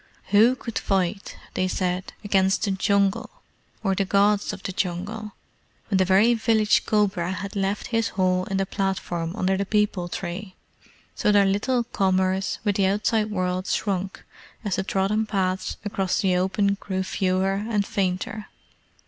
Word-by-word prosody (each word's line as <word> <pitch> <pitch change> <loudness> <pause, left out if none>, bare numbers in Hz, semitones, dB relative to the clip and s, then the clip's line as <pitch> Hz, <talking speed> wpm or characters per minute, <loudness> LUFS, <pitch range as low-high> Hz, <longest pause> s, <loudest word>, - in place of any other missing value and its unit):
Who 220 +5 +6
could 230 -3 -4
fight, 195 0 -1 0.2
they 185 - 0
said, 185 0 -2
against 195 -1 +2
the 200 - +1
Jungle, 200 0 +1 0.5
or 195 -2 +2
the 195 - +1
Gods 200 +1 +2
of 200 -2 -9
the - - -3
Jungle, 200 +4 -3 0.6
when 195 - +2
the 185 - +4
very 195 +6 +5
village 220 -2 +2
cobra 195 -4 +1
had 195 +3 -5
left 195 +1 -1
his 225 0 +2
hole 185 -1 +2
in 195 - -2
the 195 - +1
platform 190 -3 -2
under 190 +1 +1
the 200 - 0
peepul 205 -4 0
tree? 185 +2 -5 0.6
So - - +1
their 205 -1 +5
little 230 +6 +1
commerce 190 -3 0
with 205 -2 +1
the 195 -2 +3
outside 210 +2 +1
world 185 -2 -2
shrunk 190 -2 -2 0.4
as 200 -3 0
the 190 - 0
trodden 210 +2 0
paths 190 -2 -1
across 195 -2 -1
the 185 -2 +2
open 195 +2 +1
grew 190 -2 -2
fewer 190 0 0 0.2
and 205 -3 +1
fainter. 195 +3 -2
195 Hz, 155 wpm, -24 LUFS, 185-210 Hz, 0.6 s, Who